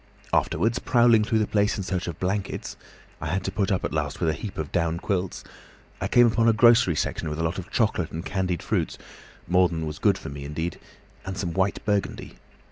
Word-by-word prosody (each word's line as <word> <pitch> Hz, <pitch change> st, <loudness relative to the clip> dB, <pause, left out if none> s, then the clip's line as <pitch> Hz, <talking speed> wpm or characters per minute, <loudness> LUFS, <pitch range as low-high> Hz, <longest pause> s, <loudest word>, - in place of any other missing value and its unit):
Afterwards, 115 Hz, +3 st, +1 dB
prowling 120 Hz, -4 st, +4 dB
through 110 Hz, +1 st, +1 dB
the 110 Hz, -, +2 dB
place 105 Hz, +2 st, +1 dB
in 100 Hz, -, -3 dB
search 90 Hz, -1 st, -2 dB
of 85 Hz, -, -5 dB
blankets—I 95 Hz, -4 st, -5 dB
had 90 Hz, +4 st, -1 dB
to 95 Hz, -, -2 dB
put 100 Hz, 0 st, 0 dB
up 95 Hz, -, 0 dB
at -, -, -3 dB
last 75 Hz, -2 st, -2 dB
with 85 Hz, -, +1 dB
a -, -, +1 dB
heap 100 Hz, +5 st, -7 dB
of 75 Hz, -2 st, -4 dB
down 85 Hz, -1 st, 0 dB
quilts—I 95 Hz, 0 st, -5 dB
came 120 Hz, -, +6 dB
upon 115 Hz, 0 st, +3 dB
a -, -, +5 dB
grocery 115 Hz, -5 st, +5 dB
section 75 Hz, -, -2 dB
with 75 Hz, -, -4 dB
a 80 Hz, -, -1 dB
lot 80 Hz, +3 st, -1 dB
of 90 Hz, -, -8 dB
chocolate 95 Hz, -7 st, +1 dB
and 80 Hz, +2 st, -5 dB
candied 95 Hz, -3 st, -2 dB
fruits, -, -, -1 dB, 0.5 s
more 90 Hz, +1 st, +4 dB
than 80 Hz, -2 st, -3 dB
was 75 Hz, -1 st, -6 dB
good -, -, +3 dB
for -, -, -8 dB
me 70 Hz, 0 st, -7 dB
indeed—and 80 Hz, +5 st, -7 dB
some 85 Hz, -4 st, -2 dB
white 95 Hz, +3 st, 0 dB
burgundy. 105 Hz, -2 st, -2 dB
95 Hz, 210 wpm, -25 LUFS, 80-105 Hz, 0.5 s, came